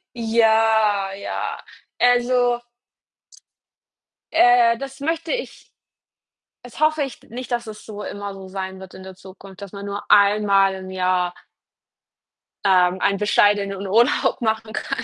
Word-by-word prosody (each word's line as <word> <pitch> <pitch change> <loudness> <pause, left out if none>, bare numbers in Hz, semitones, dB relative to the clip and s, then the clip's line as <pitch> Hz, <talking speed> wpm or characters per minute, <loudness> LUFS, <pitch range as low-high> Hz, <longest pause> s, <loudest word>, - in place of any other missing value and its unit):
Ja, 220 -3 +2
ja. 195 - -5 0.4
Also 245 0 +2 1.7
äh, 240 -1 +5
das 270 +2 -8
möchte 325 +3 -2
ich - - -6 0.9
das 245 +3 -12
hoffe 310 -1 +2
ich 270 -3 -6
nicht, 250 +2 -8
dass 240 -1 -2
es 215 -1 -10
so 210 -1 -8
immer 205 -1 -6
so 195 -1 -11
sein 190 0 -6
wird 190 -1 -12
in 190 - -11
der 190 0 -10
Zukunft, 190 +1 -14
dass 200 -2 -9
man 200 -1 -8
nur 200 0 -5
einmal 200 -1 +4
im 190 0 -8
Jahr 180 -1 0 1.3
ähm, 185 -1 +3
einen 200 - +2
bescheidenen 200 -1 +1
Urlaub 230 +7 +2
machen 220 -1 -1
kann. 275 -3 -4
210 Hz, 130 wpm, -21 LUFS, 195-240 Hz, 1.7 s, äh